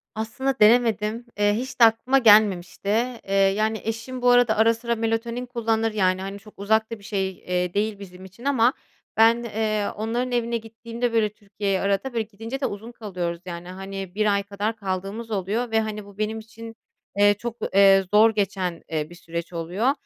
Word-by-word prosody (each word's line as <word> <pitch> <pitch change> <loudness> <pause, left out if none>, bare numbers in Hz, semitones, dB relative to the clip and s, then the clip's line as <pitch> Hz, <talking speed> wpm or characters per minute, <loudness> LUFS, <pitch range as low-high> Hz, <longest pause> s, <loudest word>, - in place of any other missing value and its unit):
Aslında 230 +5 -2
denemedim. 225 0 +3
Eee, 205 0 +3
hiç 255 +5 -4
de - - +7
aklıma 230 +4 +3
gelmemişti. 205 -6 +4 0.4
Eee, 195 - -3
yani, 205 +3 +2
eşim 230 +3 -5
bu 245 - +4
arada 245 -3 +4
ara 225 +1 +5
sıra 235 +1 -2
melatonin 230 +2 -2
kullanır. 225 -2 -1
Yani, 185 -3 +1
hani, 195 +1 -6
çok 210 +1 -16
uzak 220 +2 +1
da 230 - -5
bir - - -18
şey, 195 -2 -1
eee, 180 -1 -3
değil 205 0 -1
bizim 185 -1 -11
için 195 +7 -14
ama 255 -3 +3 0.4
ben, 230 +2 +5
eee, 215 -2 -1
onların 235 +4 -2
evine 235 -1 0
gittiğimde, 230 +1 -5
böyle, 220 -2 +2
Türkiye'ye 200 -2 -3
arada 200 +6 -1
böyle, 230 -1 0
gidince 225 +5 -7
de 270 - -1
uzun 215 +4 -5
kalıyoruz, 180 -7 -5
yani, 175 -1 -7
hani, 195 0 -7
1 210 -1 +2
ay 200 0 0
kadar 205 +2 -3
kaldığımız 200 +2 -5
oluyor 210 +5 -2
ve, 220 - +3
hani, 210 -1 -5
bu 200 0 -15
benim 215 +1 -2
için, 225 +1 -11 0.4
eee, 205 0 +6
çok, 235 +3 -6 0.2
eee, 195 0 +6
zor 215 +2 +7
geçen, 185 -4 -1
eee, 155 -1 -2
bir 175 - -12
süreç 170 0 -6
oluyor. 180 +10 0
215 Hz, 185 wpm, -24 LUFS, 195-230 Hz, 0.4 s, de